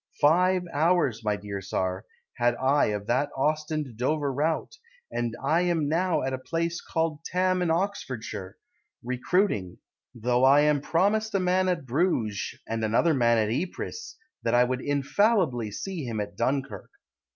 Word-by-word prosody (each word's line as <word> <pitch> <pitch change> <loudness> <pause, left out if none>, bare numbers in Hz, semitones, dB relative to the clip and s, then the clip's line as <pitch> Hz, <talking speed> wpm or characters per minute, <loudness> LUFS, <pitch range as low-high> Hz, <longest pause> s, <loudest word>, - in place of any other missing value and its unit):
Five 180 +4 +4
hours, 150 -7 +2
my 105 -1 +1
dear 100 0 -6
Tsar, 95 +1 -2 0.3
Had 120 0 +2
I 135 +3 +3
of 105 -1 -2
that 140 +6 +1
Ostend 155 -3 -1
Dover 140 +2 0
route; 160 - -1 0.3
And 120 -1 -2
I 155 +5 +2
am 170 -4 +1
now 170 +1 +1
at 130 0 -2
a 130 - -3
place 165 +5 -2
called 160 -2 -1
Thame 185 0 +1
In 175 - +1
Oxfordshire, 135 - -3 0.5
Recruiting 125 - 0 0.4
Though 120 +2 +1
I 145 +3 +6
promised 200 +8 +1
a - - +3
man 185 +1 +2
at 170 -6 -1
Bruges, 120 - 0
And 115 0 -2
another 115 +10 +3
man 120 -4 +3
at 110 -1 +1
Ypres, 185 - -5 0.2
That 115 +1 +1
I 120 - +6
would 125 +1 -1
infallibly 145 - +1
see 175 - -5
him 115 -4 -3
At 105 -2 -4
Dunkirk. 130 -5 -2
140 Hz, 150 wpm, -27 LUFS, 120-170 Hz, 0.5 s, I